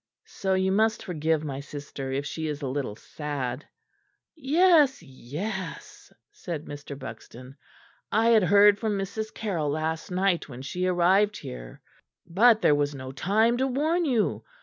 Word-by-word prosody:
"So 190 -1 -2
you 190 0 +1
must 220 +2 +1
forgive 160 -2 0
my 140 -3 -4
sister 140 -1 -7
if 140 +2 -2
she 160 +2 -4
is 150 -1 -4
a - - -1
little 130 -5 -3
sad." 140 -1 -5 0.7
"Yes, 305 - +4
yes," 165 - -7 0.2
said 170 - -6
Mr. 145 -1 -8
Buxton, 125 +1 -10 0.6
"I 225 +2 +3
had 225 -2 +6
heard 200 +3 +5
from 215 -3 -1
Mrs. 200 +3 -4
Carroll 175 -9 -2
last 160 +2 -2
night 180 -3 0
when 130 0 -9
she 180 +7 -2
arrived 190 +4 +3
here. - - -9 0.4
But 220 +6 +4
there - - +5
was 145 0 0
no 130 -1 -7
time 220 - +2
to 265 +1 +1
warn 310 +7 +1
you. 245 -7 0
175 Hz, 150 wpm, -26 LUFS, 145-215 Hz, 0.7 s, had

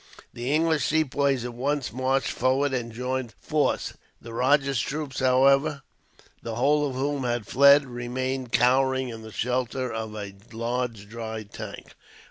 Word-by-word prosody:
The 120 +3 -3
English 160 0 +2
Sepoys 140 -4 +1
at 120 - -5
once 135 +1 -2
marched 130 +1 0
forward, 135 +3 +1
and 120 -2 -2
joined 125 0 -3
Forde's 150 -1 0
force. - - -21 0.2
The 115 -1 -10
rajah's 135 +1 +2
troops, 145 0 -4
however, 135 +3 +3 0.6
the 115 -1 -5
whole 145 +4 +2
of 130 - -6
whom 140 +1 -1
had 120 -3 -1
fled, 140 +4 +6
remained 125 +1 -3
cowering 130 +1 +3
in 115 -1 -7
the 110 0 -10
shelter 125 +2 -2
of 110 -1 -4
a 100 -2 -6 0.2
large 115 -2 -3
dry 110 0 -6
tank. 100 - -9
130 Hz, 150 wpm, -26 LUFS, 120-140 Hz, 0.6 s, fled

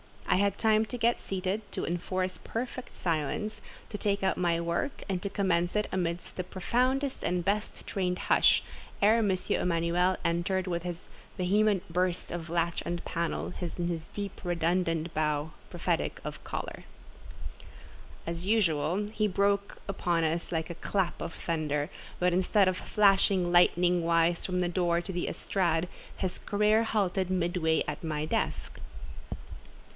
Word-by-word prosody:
I - - +4
had 200 0 +2
time 220 -1 +3
to 245 - -6
get 235 0 +2
seated, 190 +2 -2
to - - -2
enforce 185 +2 -2
perfect 250 +2 -5
silence, 165 +5 -2 0.3
to 205 - -4
take 200 -1 0
out 190 - +2
my 170 -2 +2
work, 170 +11 -2
and 190 -3 -1
to 200 - -2
commence 180 -3 +1
it 210 0 +1
amidst 175 -2 -2
the 185 - -1
profoundest 255 +9 0
and 175 -1 0
best 210 +2 -1
trained 180 -2 -1
hush, - - +4 0.4
ere 215 +3 +5
M. 220 -3 +2
Emanuel 180 0 +1
entered 175 +3 +1
with 170 -2 -1
his 175 0 -6 0.3
vehement 200 +1 +2
burst 180 0 0
of 170 -1 -5
latch 170 0 0
and 175 0 -4
panel, 170 +1 -2
and 175 -1 -3
his 165 -2 -4
deep, 200 -2 -6
redundant 170 -1 0
bow, 150 0 0 0.2
prophetic - - -1
of - - -6
choler. - - -5 1.4
As 170 +1 -4
usual 185 -2 +2
he 215 -1 +2
broke 200 +1 +1
upon 175 -4 0
us 165 +1 -1
like 160 0 -1
a - - -6
clap 190 +1 -1
of 165 - -4
thunder; 155 -1 -2 0.3
but 180 0 +3
instead 190 +2 +4
of 185 0 +1
flashing 195 -3 +3
lightning 175 0 +4
wise 165 0 +2
from 180 -1 0
the 175 - +1
door 175 -1 +1
to 180 - -6
the 175 - -2
estrade, 175 -3 0 0.3
his 185 -2 -2
career 210 +2 +3
halted 195 -4 0
midway 175 -3 +1
at 150 +2 -4
my 155 -2 -1
desk. 155 - -2
180 Hz, 150 wpm, -29 LUFS, 170-200 Hz, 1.4 s, ere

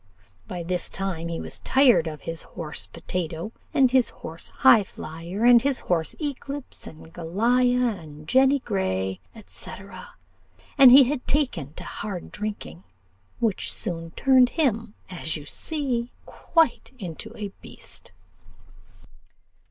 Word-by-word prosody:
By 175 -2 -5
this 175 0 -2
time 185 -4 -3
he 170 -1 -3
was - - -4
tired 255 - +4
of 155 -2 -6
his 165 0 -5
horse 155 -3 -7
Potatoe, 165 +2 -4 0.2
and 260 -2 +4
his 260 -2 +4
horse 165 +1 -9
Highflyer, 185 0 +3
and 240 -1 +8
his 275 0 0
horse 165 -3 -1
Eclipse, 285 -2 -5
and 160 +1 -12
Goliah, 235 +5 +1
and 150 -1 -12
Jenny 265 - +5
Grey, 95 - -2 0.3
&c. - - -6 1.1
and 265 -2 +10
he 270 +2 +10
had 260 +1 -2
taken 210 - 0
to - - -8
hard 200 -4 -6
drinking, 150 - -6 0.5
which 225 -5 0
soon 165 -2 -2
turned 260 -2 +5
him, 230 -9 0 0.2
as 165 -3 -2
you 150 - -10
see, 255 - -2 0.2
quite 325 -7 +1
into 190 +1 -7
a 205 -2 -4
beast. - - -9
205 Hz, 130 wpm, -25 LUFS, 165-255 Hz, 1.1 s, and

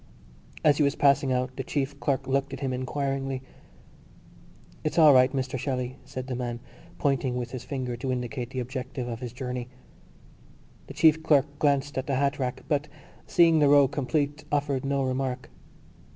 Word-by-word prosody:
As 145 -1 +5
he 150 - +3
was 140 - +2
passing 140 -1 +3
out 125 0 -1
the 135 - -2
chief 140 0 -3
clerk 140 -2 0
looked 140 +1 0
at 135 - -6
him 135 -2 -1
inquiringly. 135 0 -2 1.4
"It's 155 +2 -2
all 155 -3 +8
right, 130 0 +5
Mr 130 -1 -2
Shelley," 125 -1 -3
said 130 0 -6
the 130 - -4
man, 120 -1 -3 0.4
pointing 135 -3 0
with 120 -1 -4
his 130 - -6
finger 130 -3 -3
to 130 +2 -3
indicate 125 0 -3
the 130 -1 -3
objective 130 0 -5
of 115 -2 -5
his 125 -2 -6
journey. 125 -1 -5 1.2
The - - -9
chief 160 0 +5
clerk 145 -3 +4
glanced 140 -1 +1
at 130 - -5
the 140 - 0
hat 140 +2 0
rack 125 -1 -3
but, 145 0 0 0.4
seeing 165 -2 +5
the 145 -2 +5
row 145 -1 +7
complete, 145 +2 -1
offered 140 -2 0
no 140 0 0
remark. 130 -1 -2
135 Hz, 175 wpm, -27 LUFS, 130-145 Hz, 1.4 s, all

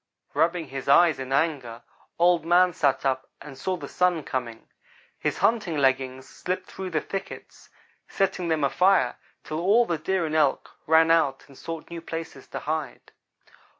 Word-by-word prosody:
"Rubbing 165 +1 +1
his 135 0 -5
eyes 160 0 +5
in 130 0 -6
anger, 135 -6 -1 0.3
Old 175 -1 +4
man 175 +2 +4
sat 140 -5 +1
up 130 -1 -1
and 140 -2 -10
saw 185 +7 -2
the - - -8
Sun 180 -3 +1
coming 120 -4 -5 0.5
his - - -1
hunting 210 -9 +1
leggings 130 -1 0
slipping 185 +1 -4
through 190 -1 -7
the 160 -3 -1
thickets 195 - -8 0.4
setting 190 -2 -1
them 160 -3 0
afire, 185 +7 +3 0.3
till 155 - -4
all 215 +7 +4
the 170 -5 -2
Deer 185 +2 0
and 155 - -4
Elk 150 -4 +1 0.2
ran 160 +1 +5
out 140 -5 +2
and 140 - -17
sought 165 +4 -8
new 170 -1 -6
places 165 -4 -7
to - - -6
hide. 155 -3 -4
160 Hz, 165 wpm, -25 LUFS, 135-175 Hz, 0.5 s, eyes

